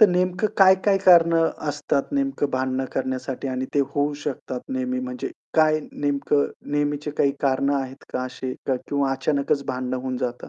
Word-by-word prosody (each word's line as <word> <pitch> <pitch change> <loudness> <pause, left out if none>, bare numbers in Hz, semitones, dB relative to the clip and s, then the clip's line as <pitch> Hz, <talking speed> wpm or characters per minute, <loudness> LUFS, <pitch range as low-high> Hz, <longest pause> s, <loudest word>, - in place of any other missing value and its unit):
तर 215 - +9
नेमकं 180 +2 +1
काय-काय 195 +1 +5
कारणं 165 -2 +6 0.2
असतात 140 - -1
नेमकं 275 - 0
भांडणं 130 0 -1
करण्यासाठी 130 0 -3
आणि 130 0 -2
ते 145 - +4
होऊ 145 +1 +1
शकतात 130 -3 -4
नेहमी 255 -1 -2
म्हणजे 255 0 -4 0.3
काय 155 -1 +4
नेमकं 145 0 +1 0.3
नेहमीची 145 0 0
काही 140 - +3
कारणं 140 +1 +2
आहेत 130 0 -8
का 125 - -1
असे 130 0 -5
क 135 - +3
किंवा 140 -1 +1
अचानकच 140 0 0
भांडणं 130 0 -2
होऊन 130 0 -3
जातं. 125 -1 -4
145 Hz, 160 wpm, -24 LUFS, 130-175 Hz, 0.3 s, तर